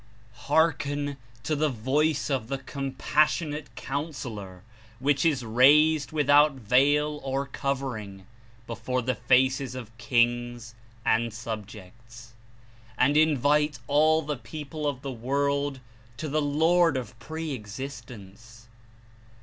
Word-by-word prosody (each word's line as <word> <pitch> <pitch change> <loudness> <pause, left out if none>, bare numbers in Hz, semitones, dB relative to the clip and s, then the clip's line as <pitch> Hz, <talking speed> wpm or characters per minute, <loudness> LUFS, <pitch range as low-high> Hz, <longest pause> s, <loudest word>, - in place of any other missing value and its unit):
"Hearken 145 -2 +1 0.3
to 155 - -1
the 155 +1 +1
Voice 145 +6 0
of 130 -5 -1
the 135 +2 -2
Compassionate 145 +1 -1
Coun 145 +4 -4
sellor, 100 -8 -8 0.3
which 135 +2 +1
is 140 -7 +1
raised 145 +6 +4
without 145 -1 +4
veil 145 +5 +2
or 135 +1 -2
covering 125 -8 -4 0.4
before 120 +2 -3
the 130 +2 0
faces 130 +1 +2
of 115 -3 -9
kings 120 -1 0 0.3
and 115 +1 +2
subjects, 115 +1 -9 0.6
and 140 +3 +3
Invite 150 -1 +3
all 155 +4 +3
the 150 -1 -3
people 150 +2 -6
of 135 -3 -3
the 135 - -4
world 140 +3 -1 0.4
to 155 - -4
the 155 +1 0
Lord 160 +2 +3
of 115 -3 -7
Pre 160 +5 -5
existence. 115 -2 -9
135 Hz, 115 wpm, -27 LUFS, 120-150 Hz, 0.6 s, raised